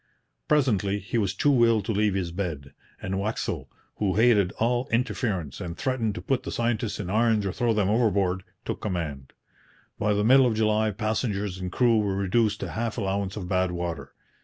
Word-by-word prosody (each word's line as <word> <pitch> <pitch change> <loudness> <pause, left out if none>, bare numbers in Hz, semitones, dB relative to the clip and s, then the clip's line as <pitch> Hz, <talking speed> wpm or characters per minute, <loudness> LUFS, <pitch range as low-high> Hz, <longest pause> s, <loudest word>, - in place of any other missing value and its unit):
Presently, 110 -9 +2
he 100 +4 -2
was 100 -3 -1
too 140 -5 +3
ill 115 -3 +3
to - - -2
leave 105 -1 +1
his 90 -3 -2
bed, 80 -7 -4 0.3
and 95 +1 -2
Waxel, 105 +3 -3 0.3
who 100 -3 0
hated 105 -4 +4
all 120 +4 0
interference 105 - -1
and 85 -2 -5
threatened 120 -6 -1
to 90 - -6
put 130 +4 0
the - - -6
scientists 115 -2 -1
in 100 - -4
irons 110 +1 +2
or 95 - 0
throw 120 +4 0
them 105 -3 +1
overboard, 100 -4 +2 0.2
took - - -4
command. 80 -9 -4 0.7
By 105 0 +2
the 105 - +1
middle 130 +2 +6
of 115 - 0
July 110 0 +2
passengers 105 -2 -2
and 90 -1 -4
crew 115 +1 +3
were 100 -2 0
reduced 105 +2 +1
to - - -4
half 115 +1 -3
allowance 100 -2 -2
of 95 -4 -5
bad 95 0 +1
water. 85 -1 -5
105 Hz, 185 wpm, -26 LUFS, 95-115 Hz, 0.7 s, middle